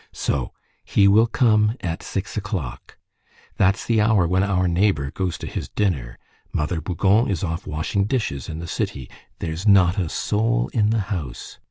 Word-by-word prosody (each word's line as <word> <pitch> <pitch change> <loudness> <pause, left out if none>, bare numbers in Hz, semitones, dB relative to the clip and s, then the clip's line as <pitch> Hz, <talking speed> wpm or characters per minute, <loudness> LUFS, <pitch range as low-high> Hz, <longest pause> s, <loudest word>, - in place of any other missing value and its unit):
So 65 -4 -2 0.3
he 100 - +3
will 110 +4 +5
come 110 -2 +3
at 85 -2 -3
six 100 +2 -4
o'clock! 95 - -5 0.6
That's 95 +1 +2
the 115 -2 +2
hour 105 -5 +3
when 90 +2 +2
our 95 -2 +1
neighbor 85 -6 +1
goes 90 0 -2
to - - -7
his - - -5
dinner. 70 -13 -1 0.3
Mother 80 +2 -1
Bougon 95 +7 +2
is 95 -6 -1
off 85 -1 -3
washing 80 +6 -1
dishes 105 - -2
in 80 - -5
the 85 - -6
city. 65 -6 -4 0.3
There's 85 +5 -4
not 95 -2 +5
a 85 -4 -1
soul 90 - 0
in 105 -2 +2
the 110 -1 +1
house. 75 -10 -6
95 Hz, 170 wpm, -22 LUFS, 80-105 Hz, 0.6 s, will